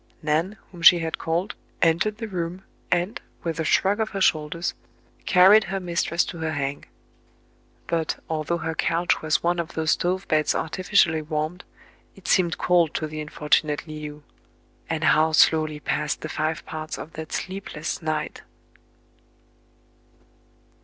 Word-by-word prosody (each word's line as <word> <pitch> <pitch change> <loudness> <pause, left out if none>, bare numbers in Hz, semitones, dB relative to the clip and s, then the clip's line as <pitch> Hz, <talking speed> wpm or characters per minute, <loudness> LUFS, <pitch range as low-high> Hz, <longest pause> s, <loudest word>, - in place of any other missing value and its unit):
Nan, 160 +7 0
whom 175 -2 -11
she 175 +1 +9
had 165 -1 -3
called, 170 +5 -1 0.3
entered 170 +6 +2
the 225 - -5
room, 180 -1 -4 0.3
and, 180 +5 0 0.2
with 165 -1 -3
a - - +1
shrug 195 +6 +2
of 220 - 0
her 195 - -4
shoulders, 165 -1 +1 0.5
carried 195 +4 +7
her 195 +2 -3
mistress 170 -1 0
to 170 - -7
her 160 0 -2
"hang." 140 -1 -3 1.0
But, 165 -2 -1
although 160 +1 -1
her 160 -1 -3
couch 170 +2 +1
was 155 -1 +1
one 175 +1 +1
of 170 -1 -4
those 160 -1 +1
stove 185 +2 0
beds 155 -1 +2
artificially 170 -2 +2
warmed, 155 +3 -3 0.5
it 190 -3 -13
seemed 175 -3 +3
cold 175 -3 +2
to 155 - -1
the 155 0 -5
unfortunate 150 0 0
Le 155 - -7 0.2
ou; 150 0 -13 0.7
and 160 -1 -2
how 160 +1 +4
slowly 155 -1 +4
passed 150 0 -2
the 155 - -5
five 155 0 -2
parts 155 0 -5
of 160 - -9
that 160 0 -7
sleepless 185 -5 -4
night 155 -1 -3
165 Hz, 150 wpm, -24 LUFS, 155-180 Hz, 1.0 s, she